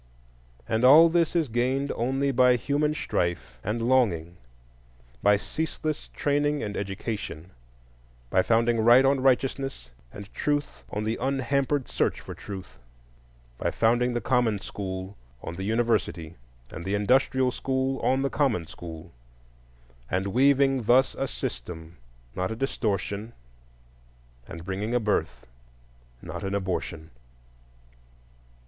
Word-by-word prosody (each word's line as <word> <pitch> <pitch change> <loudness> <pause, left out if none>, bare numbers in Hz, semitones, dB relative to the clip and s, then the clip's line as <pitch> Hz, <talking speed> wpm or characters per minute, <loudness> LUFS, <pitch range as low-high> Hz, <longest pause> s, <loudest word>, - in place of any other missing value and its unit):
And 110 +2 0
all 155 +6 +8
this 170 0 +1
is 165 -3 +2
gained 130 +4 0
only 135 +3 0
by 125 -1 +5
human 145 +5 0
strife 85 - -2
and 110 +3 -2
longing; 90 -10 +2 0.8
by 105 0 +5
ceaseless 155 +5 -4
training 145 0 +1
and 105 -1 -4
education; 100 -3 -5 0.8
by 95 - +4
founding 115 +3 +2
Right 120 +4 +6
on 135 0 +3
righteousness 135 - 0 0.2
and 100 +6 -10
Truth 145 -1 -2
on 105 - -3
the 110 +2 -2
unhampered 135 +1 0
search - - 0
for - - -8
Truth; 95 -9 -9 0.8
by - - 0
founding 120 +2 +2
the 120 - 0
common 120 -2 +2
school 95 -1 -6 0.3
on 80 - -5
the 95 - -5
university, 110 -7 0 0.4
and 80 - -7
the 95 +3 -1
industrial 130 +4 +2
school 130 +1 -1
on 130 +1 +1
the 140 - -1
common 125 - +1
school; 80 +1 -10 1.0
and 95 +2 0
weaving 135 +4 +3
thus 125 +4 +4
a 135 - -2
system, 80 - -6 0.4
not 95 0 -1
a 110 - -3
distortion, 110 -3 -2 1.1
and 85 +1 -9
bringing 100 +5 -2
a - - +4
birth, 80 - -1 0.8
not - - -6
an 95 0 -2
abortion. 90 -4 -3
115 Hz, 125 wpm, -26 LUFS, 95-135 Hz, 1.1 s, all